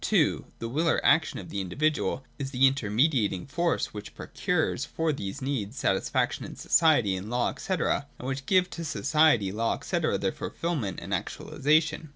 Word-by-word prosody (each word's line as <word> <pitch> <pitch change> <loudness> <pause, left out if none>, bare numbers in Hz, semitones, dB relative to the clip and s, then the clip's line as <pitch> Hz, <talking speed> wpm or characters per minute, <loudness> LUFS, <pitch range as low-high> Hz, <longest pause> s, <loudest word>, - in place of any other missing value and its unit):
(2) - - +2
The 115 - -4
will 155 +8 0
or - - +3
action 160 +2 +3
of 95 - -8
the 100 - -2
individuals 145 - 0 0.2
is 135 -1 -3
the 135 -1 +3
inter 135 -5 +1
mediating 110 - +2
force 170 +4 -1
which 105 -1 -8
procures - - -1
for 160 -1 -1
these 100 -3 -5
needs 130 -4 -3
satis 95 -7 0
faction - - 0
in - - -8
society, 125 - +3
in 95 +3 -6
law, 120 +1 0
&c., - - -7
and 165 -5 +1 0.2
which 135 0 -4
gives 185 -1 +3
to 170 - -6
society, 150 -8 +2
law 115 +3 -1
&c. - - -2
their - - 0
fulfilment 150 - -3
and - - -6
actualisation. 155 +2 0
135 Hz, 180 wpm, -27 LUFS, 105-155 Hz, 0.2 s, or